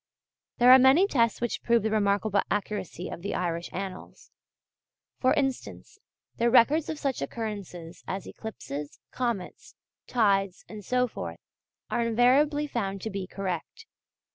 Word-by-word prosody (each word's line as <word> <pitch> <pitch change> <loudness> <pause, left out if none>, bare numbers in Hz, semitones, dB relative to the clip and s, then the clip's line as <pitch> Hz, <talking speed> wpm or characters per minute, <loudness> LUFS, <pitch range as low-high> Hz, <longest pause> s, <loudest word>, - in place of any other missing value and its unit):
There 245 0 +7
are 260 - +10
many 265 +9 +6
tests 230 - +1
which 240 -1 -2
prove 235 -2 +2
the 220 - 0
remarkable 205 -1 +2
accuracy 200 -3 -3
of - - -7
the 200 - -3
Irish 170 -1 -2
Annals. 190 0 -7 0.9
For 255 - +3
instance, 270 -3 -3 0.4
their 235 +1 +2
records 280 +6 +4
of 315 - -3
such 275 -3 -2
occurrences 200 -7 -6
as 190 0 -4
eclipses, 150 -10 -7
comets, 235 -8 -4 0.3
tides, 200 -5 +1
and 215 -1 -9
so 250 +5 +1
forth, - - -6 0.5
are 240 - +1
invariably 260 +6 +3
found 200 -8 -3
to 220 - -3
be 195 -1 -4
correct. 190 - -5
220 Hz, 140 wpm, -27 LUFS, 195-250 Hz, 0.9 s, are